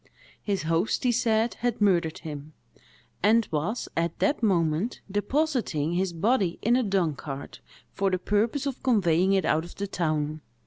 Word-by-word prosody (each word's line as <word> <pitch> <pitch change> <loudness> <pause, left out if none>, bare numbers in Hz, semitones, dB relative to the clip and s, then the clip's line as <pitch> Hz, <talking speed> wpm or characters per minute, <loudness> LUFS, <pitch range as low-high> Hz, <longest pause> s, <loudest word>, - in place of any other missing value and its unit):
His 200 -4 -2
host, 165 +6 0
he 250 - +3
said, 225 -1 +1
had 240 -1 -1
murdered 175 -6 +2
him, 150 -1 -8 0.7
and 220 +2 +4
was, 165 +10 -2
at 170 +1 -1
that 295 -2 +1
moment, 175 0 +1
depositing 205 - 0
his 185 +1 0
body 190 +1 +1
in 235 +3 +4
a 255 - +3
dung 190 -8 +1
cart, 140 0 -8 0.3
for 195 0 +1
the 185 - 0
purpose 220 +9 0
of 275 -2 -4
conveying 190 -6 +3
it 190 -2 +2
out 155 +1 +2
of 175 - -11
the 200 - -3
town. 155 -5 -2
195 Hz, 165 wpm, -26 LUFS, 165-225 Hz, 0.7 s, and